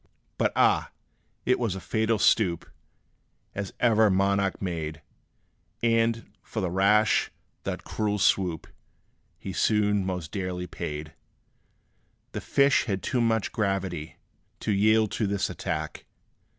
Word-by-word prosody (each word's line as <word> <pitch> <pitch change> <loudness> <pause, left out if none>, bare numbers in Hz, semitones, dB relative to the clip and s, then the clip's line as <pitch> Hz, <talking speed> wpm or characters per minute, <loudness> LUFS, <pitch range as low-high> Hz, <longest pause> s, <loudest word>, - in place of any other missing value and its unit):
But - - +2
ah! - - +3 0.6
it 125 - +2
was 115 -6 -1
a - - -5
fatal 110 +3 0
stoop, 90 -6 +2 0.9
As 100 -1 -4
ever 110 -3 +4
monarch 100 0 +1
made; 80 -5 -4 0.8
And, 115 0 +2 0.2
for 110 - -5
that 90 -4 -1
rash 105 +4 +3 0.4
that - - -3
cruel 105 -1 -1
swoop, 90 -4 +1 0.7
He 95 - -6
soon 105 0 +2
most 90 -4 -4
dearly 90 -2 -3
paid! 75 -3 -6 1.2
The - - -5
fish 140 0 +3
had 95 -5 -2
too 125 -3 0
much 110 -2 +1
gravity 95 -7 -2 0.4
To - - -1
yield 110 +1 +3
to 105 - -1
this 100 -1 -1
attack. - - -4
100 Hz, 125 wpm, -27 LUFS, 90-110 Hz, 1.2 s, ever